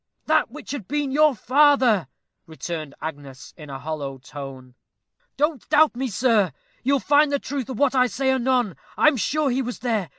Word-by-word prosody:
"That 310 -4 +2
which 300 +6 -9
had 265 -10 -6
been 290 -1 -1
your 300 0 +4
father," 260 - +3 0.4
returned 160 -2 -6
Agnes, 140 -4 -8
in 150 -2 -12
a 135 - -6
hollow 140 -2 -5
tone. 130 -1 -10 0.6
"Don't 295 -2 -1
doubt 305 -3 +4
me, 260 +2 -2
sir 220 -2 +2 0.3
you'll 275 +1 +2
find 290 +2 +3
the 285 - +2
truth 270 -3 -5
of 255 - -5
what 280 0 +2
I 255 -1 +4
say 265 +2 0
anon. 250 -6 +1 0.2
I - - +6
am 305 - -2
sure 280 +5 0
he 260 +2 0
was 245 -1 -5
there. 220 -7 -2
250 Hz, 185 wpm, -23 LUFS, -, 0.6 s, I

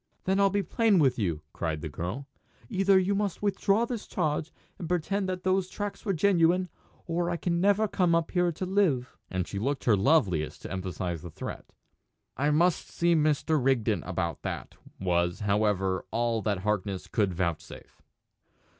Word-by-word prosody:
"Then 190 +1 +1
I'll 200 0 +5
be 200 +1 0
plain 215 +3 +2
with 135 -6 +3
you," 85 -7 -1
cried 80 -2 -3
the 80 - -4
girl. 90 - -5 0.4
"Either 195 0 +4
you 190 +2 +2
must 200 -1 -2
withdraw 200 +2 +2
this 235 -3 -5
charge, 155 -2 -1 0.3
and 170 - -5
pretend 185 +3 0
that 180 -1 -4
those 185 0 +1
tracks 205 0 -5
were 200 - +1
genuine, 180 0 +3 0.4
or 170 +1 -1
I 170 - -1
can 170 0 -1
never 205 +2 +3
come 180 -4 +2
up 165 -1 0
here 175 -1 +2
to 170 +3 -4
live!" 180 -10 +1
And 90 -1 -2
she 100 - -4
looked 135 +5 -1
her 115 - +4
loveliest 95 - +1
to - - -7
emphasise 90 -3 -3
the 85 - -8
threat. - - -7 0.7
"I 145 +4 +1
must 170 +3 +2
see 170 0 +2
Mr. 155 -2 +2
Rigden 120 -5 +2
about 85 -3 -3
that," - - -5 0.3
was, 90 +1 0
however, 100 -2 +1
all 115 0 0
that 100 -4 -1
Harkness 100 -2 -2
would 105 -4 +2
vouchsafe. 85 -2 -4
150 Hz, 170 wpm, -28 LUFS, -, 0.7 s, I'll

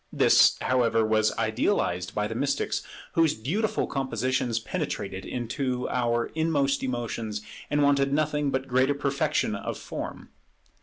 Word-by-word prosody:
This, - - +5
however, 115 -3 +2
was 110 0 +3
idealized 110 - 0
by 105 0 0
the 115 - -5
mystics, 140 +5 -1 0.3
whose 165 -2 +3
beautiful 185 - -1
compositions 130 -3 -1
penetrated 95 -3 -4
into 125 +1 -2
our 120 -1 0
inmost 145 -4 +1
emotions, 115 -4 -3 0.3
and 145 0 +2
wanted 140 -1 +3
nothing 150 0 +1
but 130 0 -2
greater 130 +2 +2
perfection 140 -1 0
of - - -4
form. - - -7
130 Hz, 125 wpm, -27 LUFS, 115-140 Hz, 0.3 s, This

